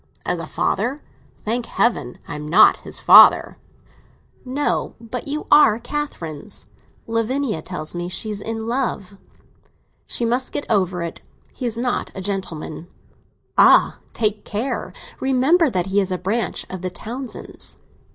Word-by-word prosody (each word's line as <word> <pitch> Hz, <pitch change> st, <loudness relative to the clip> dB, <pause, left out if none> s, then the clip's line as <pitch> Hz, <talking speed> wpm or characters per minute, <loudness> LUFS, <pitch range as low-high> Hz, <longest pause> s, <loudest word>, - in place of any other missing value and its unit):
"As -, -, -1 dB
a -, -, -6 dB
father? 275 Hz, +4 st, -1 dB, 0.5 s
Thank 230 Hz, +2 st, -1 dB
Heaven 235 Hz, -, 0 dB
I -, -, -6 dB
am 150 Hz, 0 st, -6 dB
not 160 Hz, -, +6 dB
his -, -, -3 dB
father!" -, -, +7 dB, 0.9 s
"No; 270 Hz, +3 st, -1 dB
but 235 Hz, +3 st, -6 dB
you 300 Hz, +2 st, -3 dB
are 230 Hz, -8 st, +7 dB
Catherine's. 230 Hz, -, -5 dB, 0.4 s
Lavinia 230 Hz, -, -1 dB
tells 160 Hz, -2 st, -4 dB
me 175 Hz, 0 st, -4 dB
she 215 Hz, +4 st, -3 dB
is 205 Hz, -1 st, -4 dB
in 225 Hz, 0 st, -4 dB
love." 225 Hz, -6 st, -3 dB, 0.9 s
"She 235 Hz, -, -2 dB
must 245 Hz, +3 st, 0 dB
get -, -, -1 dB
over 185 Hz, -4 st, +1 dB
it. 170 Hz, -, -6 dB, 0.3 s
He 250 Hz, -, -4 dB
is 230 Hz, -1 st, -2 dB
not 245 Hz, +1 st, -1 dB
a -, -, -5 dB
gentleman." 180 Hz, -4 st, -4 dB, 0.7 s
"Ah, -, -, +6 dB
take 210 Hz, -2 st, 0 dB
care! 230 Hz, +6 st, -3 dB, 0.3 s
Remember 270 Hz, +6 st, +3 dB
that 180 Hz, -6 st, -1 dB
he 195 Hz, +1 st, +1 dB
is 190 Hz, -, -1 dB
a 185 Hz, -, 0 dB
branch 205 Hz, +6 st, -2 dB
of 185 Hz, -1 st, -7 dB
the 185 Hz, -, -2 dB
Townsends." 240 Hz, +7 st, -6 dB
225 Hz, 145 wpm, -21 LUFS, 185-255 Hz, 0.9 s, father